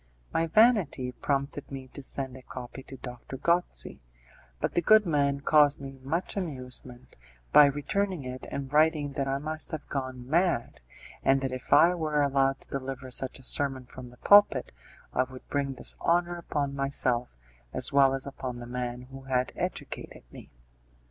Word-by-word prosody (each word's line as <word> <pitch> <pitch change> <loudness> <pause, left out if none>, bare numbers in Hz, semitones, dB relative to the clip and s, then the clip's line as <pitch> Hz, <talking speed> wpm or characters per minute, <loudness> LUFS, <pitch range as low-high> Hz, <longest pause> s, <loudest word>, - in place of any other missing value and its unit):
My 165 0 +1
vanity 185 - +3
prompted 140 +2 -2
me 135 -1 -7
to 140 - -9
send 130 -1 -3
a 130 - -10
copy 125 +1 -8
to 135 0 -11
Doctor 125 +1 -8
Gozzi, 170 +5 -1 0.6
but - - -1
the 175 - +2
good 215 +4 +6
man 140 -4 +1
caused 150 -1 +4
me 135 -1 -9
much 160 +7 -2
amusement 130 -7 -5 0.4
by 150 - +10
returning 160 +5 -1
it 130 0 -7
and 140 0 -5
writing 150 -2 +3
that 135 0 -2
I 135 0 0
must 155 +2 -4
have 155 -3 -6
gone 130 -3 -4
mad, 170 -4 +1 0.4
and 135 0 +3
that 135 -1 -2
if 130 0 -7
I 165 +5 +7
were 155 -4 0
allowed 135 -1 +1
to - - -14
deliver 135 -1 -5
such 130 +1 -2
a 130 - -14
sermon 135 -1 0
from 125 0 -10
the 125 - -17
pulpit 205 -9 +5 0.4
I - - +2
would 130 0 -6
bring 140 -1 -1
dishonour 175 +6 0
upon 145 -4 -2
myself 130 - 0 0.3
as - - +2
well 135 -1 +5
as 135 - -3
upon 130 -3 -6
the 120 - -8
man 125 0 -4
who 135 +1 -12
had 130 -1 0
educated - - -5
me. - - -12
135 Hz, 170 wpm, -28 LUFS, 130-150 Hz, 0.6 s, by